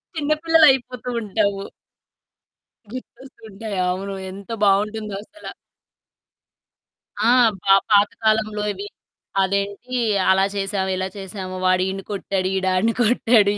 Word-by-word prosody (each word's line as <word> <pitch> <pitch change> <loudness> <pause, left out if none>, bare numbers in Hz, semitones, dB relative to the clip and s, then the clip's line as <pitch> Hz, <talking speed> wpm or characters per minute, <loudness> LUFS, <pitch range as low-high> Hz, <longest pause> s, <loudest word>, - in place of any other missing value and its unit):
చిన్నపిల్లలు 315 +1 +3
అయిపోతూ 250 -1 -4
ఉంటాము. 200 -1 -1 1.3
గుర్తొస్తు 255 +1 -11
ఉంటాయి. 205 0 -6
అవును. 195 +2 -3 0.2
ఎంత 200 +3 -11 0.2
బాగుంటుందో 210 +1 +1
అసల. 315 - -18 1.7
ఆ! 220 - +3 0.3
బా 195 - +5 0.2
పాతకాలంలో 215 +1 +2
ఇవి. 200 +2 -7 0.5
అదేంటి 200 +5 -2 0.4
అలా 190 +1 +4
చేశామ, 195 -1 -1
ఇలా 185 0 -2
చేశాము? 190 -1 -6
వాడు 185 0 +3
ఈడ్ని 195 0 -5
కొట్టాడు, 195 -1 -2
ఈడు 190 0 -1
ఆడ్ని 220 +5 +2
కొట్టాడు. 225 -2 +4
205 Hz, 105 wpm, -21 LUFS, 195-225 Hz, 1.7 s, బా